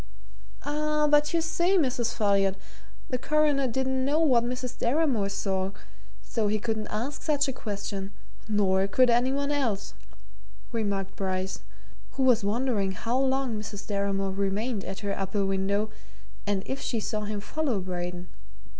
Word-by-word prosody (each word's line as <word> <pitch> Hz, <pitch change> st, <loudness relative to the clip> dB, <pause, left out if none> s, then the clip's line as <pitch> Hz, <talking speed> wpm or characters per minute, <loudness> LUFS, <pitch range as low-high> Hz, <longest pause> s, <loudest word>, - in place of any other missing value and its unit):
"Ah, 300 Hz, +1 st, +1 dB
but 295 Hz, 0 st, +4 dB
you 335 Hz, -, +2 dB
see, 345 Hz, +4 st, +2 dB
Mrs. 250 Hz, -7 st, +1 dB
Folliot, 200 Hz, -3 st, +3 dB, 0.6 s
the 255 Hz, -, 0 dB
Coroner 295 Hz, -1 st, +2 dB
didn't 260 Hz, +2 st, 0 dB
know 290 Hz, +4 st, +2 dB
what 260 Hz, -8 st, +4 dB
Mrs. 250 Hz, 0 st, -3 dB
Deramore 245 Hz, -6 st, +2 dB
saw, 195 Hz, -1 st, -1 dB, 0.5 s
so 220 Hz, -3 st, -1 dB
he 210 Hz, +1 st, +2 dB
couldn't 215 Hz, 0 st, -2 dB
ask 255 Hz, +7 st, -3 dB
such 295 Hz, -2 st, +2 dB
a 270 Hz, -, -1 dB
question, 205 Hz, -3 st, -4 dB, 0.4 s
nor 195 Hz, -2 st, +3 dB
could 250 Hz, +4 st, +4 dB
any 245 Hz, +2 st, +3 dB
one 280 Hz, +1 st, 0 dB
else," 235 Hz, -9 st, -1 dB, 0.8 s
remarked 200 Hz, -4 st, -2 dB
Bryce, 190 Hz, -1 st, -2 dB, 0.5 s
who 270 Hz, -, 0 dB
was 245 Hz, -4 st, +4 dB
wondering 210 Hz, -2 st, +1 dB
how 230 Hz, +6 st, -2 dB
long 265 Hz, -4 st, +1 dB
Mrs. 210 Hz, -1 st, -6 dB
Deramore 200 Hz, -1 st, 0 dB
remained 200 Hz, +3 st, -1 dB
at 190 Hz, +2 st, -5 dB
her 200 Hz, -1 st, -1 dB
upper 195 Hz, +1 st, -1 dB
window 200 Hz, +2 st, 0 dB, 0.6 s
and 200 Hz, -2 st, +1 dB
if 265 Hz, -, -3 dB
she 235 Hz, -, -1 dB
saw 215 Hz, 0 st, -2 dB
him 210 Hz, 0 st, -3 dB
follow 265 Hz, 0 st, -1 dB
Braden. 180 Hz, -1 st, -4 dB
220 Hz, 150 wpm, -28 LUFS, 200-265 Hz, 0.8 s, but